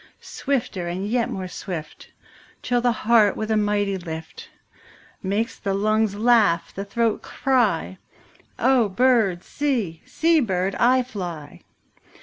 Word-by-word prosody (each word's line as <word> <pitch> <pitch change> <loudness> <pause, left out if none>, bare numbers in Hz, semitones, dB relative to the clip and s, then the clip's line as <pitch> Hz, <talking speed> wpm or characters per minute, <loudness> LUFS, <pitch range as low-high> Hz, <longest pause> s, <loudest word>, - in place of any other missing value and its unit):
Swifter 230 -10 -3
and 180 +3 -3
yet 235 +1 0
more 190 -1 -4
swift, 175 -4 -7
5 - - -27 0.5
Till 245 -1 +1
the 245 0 +3
heart 225 -2 +3
with 215 0 -3
a - - +3
mighty 205 -2 0
lift 160 -2 -8 0.7
Makes 205 +5 -2
the 195 -2 -1
lungs 215 0 +1
laugh, 215 -6 +3
the 195 - -4
throat 225 +2 0
cry:— 220 - 0 0.6
'O 255 -5 +3
bird, 220 -5 +2
see; 235 - -2
see, 330 0 +2
bird, 190 -6 0
I 255 +1 +4
fly. 175 - -7
210 Hz, 130 wpm, -23 LUFS, 185-240 Hz, 0.7 s, I